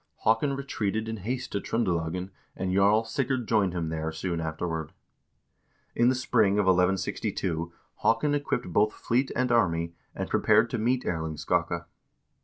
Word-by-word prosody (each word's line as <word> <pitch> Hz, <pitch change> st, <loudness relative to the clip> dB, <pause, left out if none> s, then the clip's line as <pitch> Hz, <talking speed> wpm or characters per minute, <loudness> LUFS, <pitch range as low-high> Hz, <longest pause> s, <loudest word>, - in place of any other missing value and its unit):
Haakon 125 Hz, +6 st, +2 dB
re 140 Hz, -, -4 dB
treated 110 Hz, -4 st, -2 dB
in 110 Hz, 0 st, -3 dB
haste 125 Hz, +5 st, -4 dB
to 100 Hz, -, -1 dB
Tr0ndelagen, 90 Hz, -4 st, -1 dB, 0.2 s
and 95 Hz, -1 st, -2 dB
Jarl 100 Hz, +3 st, +4 dB
Sigurd 125 Hz, +1 st, -1 dB
joined 100 Hz, -5 st, +2 dB
him 85 Hz, -3 st, -2 dB
there 80 Hz, 0 st, -2 dB
soon 85 Hz, +1 st, -3 dB
afterward. 80 Hz, -1 st, -3 dB, 1.0 s
In 120 Hz, +1 st, +4 dB
the 130 Hz, -, +2 dB
spring 115 Hz, -5 st, +2 dB
of 105 Hz, -1 st, +2 dB
1162 90 Hz, -2 st, 0 dB, 0.3 s
Haakon 115 Hz, +6 st, +2 dB
equipped 145 Hz, -11 st, -2 dB
both 105 Hz, +3 st, +3 dB
fleet 130 Hz, +3 st, 0 dB
and 125 Hz, 0 st, +1 dB
army, 85 Hz, -7 st, +2 dB, 0.2 s
and -, -, -3 dB
prepared -, -, +3 dB
to -, -, -1 dB
meet 125 Hz, +3 st, +1 dB
Erling 80 Hz, -2 st, -2 dB
Skakke. -, -, -1 dB
100 Hz, 155 wpm, -27 LUFS, 85-120 Hz, 1.0 s, Jarl